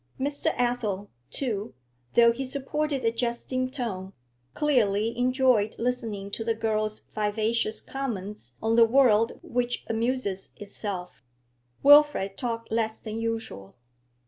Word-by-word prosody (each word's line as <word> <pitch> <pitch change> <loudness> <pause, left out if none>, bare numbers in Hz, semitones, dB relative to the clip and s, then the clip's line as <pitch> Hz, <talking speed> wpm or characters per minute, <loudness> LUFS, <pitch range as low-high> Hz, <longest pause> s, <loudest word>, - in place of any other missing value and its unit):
Mr. 285 +2 0
Athel, 225 -5 -1 0.2
too, 220 - -3 0.4
though 235 0 +7
he 250 +3 -4
supported 280 0 -2
a 225 - +4
jesting 240 +2 -2
tone, 200 -8 -5 0.4
clearly 230 -6 +2
enjoyed 250 -3 +2
listening 225 -5 -3
to 225 - -3
the 230 0 0
girl's 215 -1 -1
vivacious 215 +1 0
comments 210 - -5
on 225 +1 +2
the 230 0 +7
world 230 -2 +4
which 245 0 -2
amuses 225 -4 -2
itself. 195 - -6 0.6
Wilfrid 290 -9 +6
talked 230 -2 -4
less 220 -1 0
than 220 0 -5
usual. 225 - -4
230 Hz, 120 wpm, -27 LUFS, 210-250 Hz, 0.6 s, though